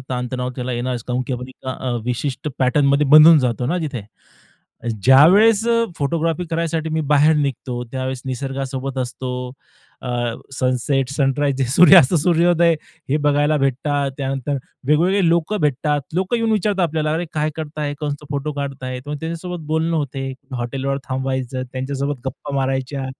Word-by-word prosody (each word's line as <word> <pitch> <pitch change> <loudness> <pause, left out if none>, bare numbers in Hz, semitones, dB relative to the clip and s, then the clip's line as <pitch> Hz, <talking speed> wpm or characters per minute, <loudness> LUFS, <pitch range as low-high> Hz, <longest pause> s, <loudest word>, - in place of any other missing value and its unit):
ताणतणाव 125 0 -3
त्याला 125 0 -3
येणारच. 120 0 -3
कारण 125 0 -2
की 130 - -3
आपण 125 0 -5
एका, 130 0 -7
अ, 120 - -1
विशिष्ट 130 +4 -3
पॅटर्नमध्ये 140 +2 +3
बंधून 155 +2 +9
जातो 125 -2 -1
ना 175 +7 0
तिथे. 145 -9 -4 1.0
ज्यावेळेस 195 - +6
अ, 230 0 +3
फोटोग्राफी 165 +3 -1
करायसाठी 165 -1 -1
मी 160 0 0
बाहेर 150 +2 +5
निघतो, 130 -3 -2
त्यावेळेस 130 -1 -3
निसर्गासोबत 135 0 -4
असतो, 130 0 -4 0.7
अ, 130 - -5 0.5
सनसेट, 130 +1 0
सनराइज, 140 -1 0
सूर्यास्त, 175 -4 +7
सूर्योदय 170 0 +3 0.4
हे 145 - +3
बघायला 145 +1 +3
भेटतात. 140 +1 0
त्यानंतर 135 0 -2 0.3
वेगवेगळे 175 +5 +3
लोकं 170 +5 +1
भेटतात. 145 0 +1
लोकं 190 +6 0
येऊन 225 -1 0
विचारतात 205 -3 +1
आपल्याला, 155 -1 -1
"अरे, 170 +2 -1
काय 155 0 0
करताय, 150 -2 -4
कसं 145 0 -4
फोटो 145 +1 -2
काढताय?" 135 -3 -5
मग 150 - -3
त्यांच्यासोबत 170 +1 -5
बोलणं 160 +2 0
होतं, 135 -2 -3 0.2
हॉटेलवर 135 +3 -2
थांबायचं, 130 -1 -2
त्यांच्यासोबत 135 +1 -3
गप्पा 140 +2 -5
मारायच्या. 135 +1 -2
140 Hz, 140 wpm, -20 LUFS, 130-160 Hz, 1.0 s, बंधून